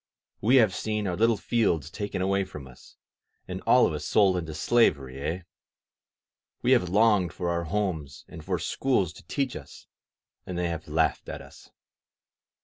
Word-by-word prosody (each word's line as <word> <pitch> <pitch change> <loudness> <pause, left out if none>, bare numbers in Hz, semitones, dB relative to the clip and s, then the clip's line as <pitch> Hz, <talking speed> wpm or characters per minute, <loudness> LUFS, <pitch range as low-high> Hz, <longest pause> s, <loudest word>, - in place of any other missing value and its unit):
We 120 +6 +4
have 110 -7 +5
seen 105 +1 -2
our 90 -2 -1
little 115 +3 +3
fields 90 - 0
taken 100 -2 -3
away 95 +1 +1
from 75 -7 -9
us, 65 -2 -16 0.5
and - - -5
all - - +6
of - - -1
us - - -4
sold 100 -3 +3
into 80 -3 -4
slavery, 70 - +2
eh? 80 +5 -2 1.2
We - - +3
have 90 - +4
longed 105 -2 +3
for 90 -1 -2
our 85 0 -1
homes 80 -7 -3
and 80 -3 -10
for 90 +1 -1
schools 95 +1 0
to - - -16
teach 135 -3 -2
us, 70 -2 -11 0.6
and 90 - -6
they 90 -1 0
have 80 -1 -5
laughed 80 +1 0
at - - -5
us. - - -16
90 Hz, 170 wpm, -27 LUFS, 80-105 Hz, 1.2 s, all